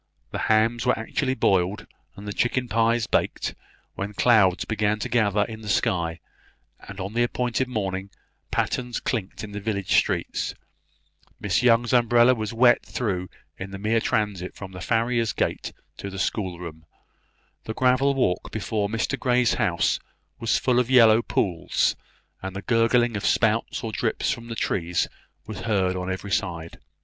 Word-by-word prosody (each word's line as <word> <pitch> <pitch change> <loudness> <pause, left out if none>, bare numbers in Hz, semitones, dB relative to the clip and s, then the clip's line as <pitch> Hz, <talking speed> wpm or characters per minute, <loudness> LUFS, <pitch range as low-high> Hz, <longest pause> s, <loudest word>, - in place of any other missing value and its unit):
The - - -3
hams 115 +3 +2
were 125 - +3
actually 130 +4 -1
boiled, 95 -3 +1 0.3
and 100 +1 -10
the 100 - -3
chicken 125 +3 0
pies 115 0 +2
baked, - - -1 0.4
when 100 +1 -5
clouds 105 -7 +4
began 105 -1 0
to 105 - -4
gather 105 -3 +2
in 110 +1 -7
the 105 - -7
sky; 85 -8 0 0.6
and 100 0 -10
on 95 +2 -5
the 120 - +1
appointed 125 +1 0
morning, 95 -5 -3 0.4
pattens 125 -2 -1
clinked 110 -5 -3
in 105 - -7
the 100 - -5
village 100 -2 -1
street, - - 0 0.8
Miss 100 +1 +1
Young's 120 0 +3
umbrella 120 +1 +5
was 110 -4 -3
wet 120 +1 +4
through 95 -7 -3 0.3
in 95 - -5
the 95 - -7
mere 110 +3 +1
transit 100 -5 -1
from 95 -2 -8
the 90 -1 -9
farrier's 115 +1 +1
gate - - -2 0.3
to 100 - -6
the 95 - -8
schoolroom; 90 -5 -3 0.8
the 110 - -5
gravel 130 +2 +3
walk 95 -9 0
before 105 -1 -2
Mr 115 +5 -1
Grey's 125 -2 +2
house 90 -7 +1 0.4
was 115 -1 +1
full 125 -1 +2
of 125 0 0
yellow 115 -3 +6
pools, 90 -6 0 0.5
and 95 0 -6
the 95 - -5
gurgling 115 0 +2
of 105 - -3
spouts 115 0 +1
or 115 - -3
drips 110 +1 -1
from 115 -3 -5
the 115 - -5
trees 85 -5 0 0.4
was 110 -3 -7
heard 95 -4 0
on 90 0 -3
every 95 +2 -5
side. 85 -5 -2
110 Hz, 160 wpm, -25 LUFS, 95-120 Hz, 0.8 s, yellow